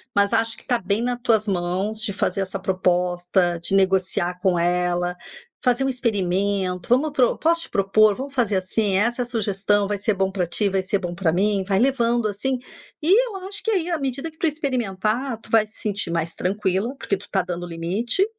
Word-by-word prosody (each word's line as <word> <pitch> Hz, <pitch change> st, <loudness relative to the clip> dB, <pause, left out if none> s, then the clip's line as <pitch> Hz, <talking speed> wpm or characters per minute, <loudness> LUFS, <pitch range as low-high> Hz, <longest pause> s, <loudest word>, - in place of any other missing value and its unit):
Mas 200 Hz, +2 st, +3 dB
acho 225 Hz, 0 st, +1 dB
que -, -, -16 dB
tá 245 Hz, -2 st, +1 dB
bem 200 Hz, +3 st, -1 dB
na 245 Hz, 0 st, -1 dB
tuas 225 Hz, -3 st, +2 dB
mãos 190 Hz, +3 st, -1 dB
de 205 Hz, -, -1 dB
fazer 195 Hz, -, -1 dB
essa 190 Hz, +1 st, -3 dB
proposta, 180 Hz, -1 st, +1 dB
de 190 Hz, -, 0 dB
negociar 185 Hz, -2 st, +1 dB
com 185 Hz, -2 st, +2 dB
ela, 175 Hz, 0 st, 0 dB, 0.5 s
fazer 250 Hz, 0 st, +2 dB
um 270 Hz, -, +1 dB
experimento. 195 Hz, -6 st, -1 dB
"Vamos 270 Hz, +6 st, +3 dB
pro" 260 Hz, -4 st, +2 dB
"Posso 335 Hz, +1 st, +2 dB
te -, -, -2 dB
propor?", 205 Hz, +2 st, +3 dB
"Vamos 270 Hz, +4 st, -6 dB
fazer 230 Hz, -6 st, +1 dB
assim?", 190 Hz, +2 st, 0 dB
"Essa 240 Hz, +4 st, +1 dB
sugestão 205 Hz, -3 st, 0 dB
vai 205 Hz, 0 st, -1 dB
ser 210 Hz, +2 st, 0 dB
bom 190 Hz, 0 st, 0 dB
para 185 Hz, -3 st, -1 dB
ti, 200 Hz, +4 st, +2 dB
vai 190 Hz, 0 st, 0 dB
ser 195 Hz, +2 st, -1 dB
bom 175 Hz, -2 st, -4 dB
para 170 Hz, -2 st, +1 dB
mim". 200 Hz, +2 st, +1 dB
Vai 195 Hz, -1 st, +2 dB
levando 240 Hz, -2 st, +2 dB
assim. 255 Hz, +6 st, -1 dB, 0.5 s
E 325 Hz, -, +2 dB, 0.2 s
eu 440 Hz, -, -7 dB
acho 405 Hz, +1 st, -4 dB
que, -, -, -1 dB
aí, 360 Hz, -5 st, 0 dB
a 335 Hz, -, 0 dB
medida 275 Hz, +3 st, -3 dB
que 315 Hz, -, -26 dB
tu 330 Hz, -, +1 dB
experimentar, 245 Hz, -4 st, -1 dB
tu -, -, -16 dB
vai 220 Hz, -1 st, +4 dB
se 215 Hz, -, -9 dB
sentir 205 Hz, -3 st, -1 dB
mais 165 Hz, -1 st, -1 dB
tranquila, 195 Hz, +5 st, -1 dB
porque 200 Hz, -, -1 dB
tu 195 Hz, -, -14 dB
tá 190 Hz, -, +1 dB
dando 175 Hz, 0 st, -5 dB
limite. 190 Hz, -, 0 dB
205 Hz, 205 wpm, -23 LUFS, 185-240 Hz, 0.5 s, vai